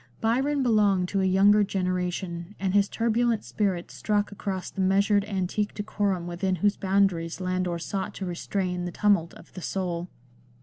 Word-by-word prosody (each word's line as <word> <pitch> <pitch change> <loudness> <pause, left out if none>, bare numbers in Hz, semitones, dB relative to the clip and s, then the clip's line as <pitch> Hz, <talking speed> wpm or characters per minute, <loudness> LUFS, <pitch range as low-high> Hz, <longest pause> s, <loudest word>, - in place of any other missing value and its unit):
Byron 265 +5 +1
belonged 205 -6 +3
to 195 - 0
a - - +2
younger 200 +3 +5
generation, 180 -1 -2
and 190 -1 -1
his 200 0 +3
turbulent 230 0 +1
spirit 190 -5 -2
struck 205 -1 -1
across 195 -2 -4
the 195 - -3
measured 200 +2 +3
antique 205 +1 -2
decorum 205 -4 -1
within 180 +2 -1
whose 205 +4 +2
boundaries 190 -4 +1
Landor 185 -1 -1
sought 190 +3 -4
to 195 - -4
restrain 180 0 -2
the 175 - -4
tumult 200 -4 +2
of - - -16
the 185 - -8
soul. 175 -1 -3
195 Hz, 160 wpm, -26 LUFS, 180-205 Hz, -, younger